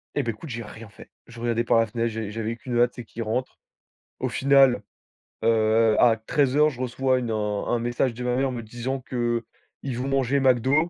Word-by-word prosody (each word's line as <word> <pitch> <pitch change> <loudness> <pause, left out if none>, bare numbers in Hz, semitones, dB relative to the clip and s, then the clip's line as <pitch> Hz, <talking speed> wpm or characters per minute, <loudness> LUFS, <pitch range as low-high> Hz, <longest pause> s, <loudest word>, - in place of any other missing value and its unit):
Et - - +1
ben 115 - -1
écoute, 150 +9 -11
j'ai 115 -1 -5
rien 110 +1 -11
fait. 100 - -15 0.2
Je 120 -1 -12
regardais 115 0 0
par 115 - +3
la 115 - +3
fenêtre, 115 +1 -2
j'ai 110 -2 -5
j'avais 115 +1 -3
qu'une 120 0 -3
hâte, 120 0 +3
c'est 120 - -7
qu'il 115 +1 -6
rentre. 120 +4 -3 0.6
Au - - 0
final, 135 -5 +4 0.6
heu, 110 0 +3
à 115 -2 +5
13:00, 145 +5 +2
je 130 -4 -8
reçois 130 +1 +1
une, 120 -2 -4
heu, - - 0
un 105 -1 -2
un - - 0
message 120 +1 0
de 125 +2 -7
ma 125 0 0
mère 135 +1 +1
me 120 -2 -4
disant 120 +4 -4
qu'ils 120 +1 -4
vont 130 +2 -3
manger 135 0 +1
McDo, 135 +5 +3
120 Hz, 215 wpm, -25 LUFS, 115-130 Hz, 0.6 s, à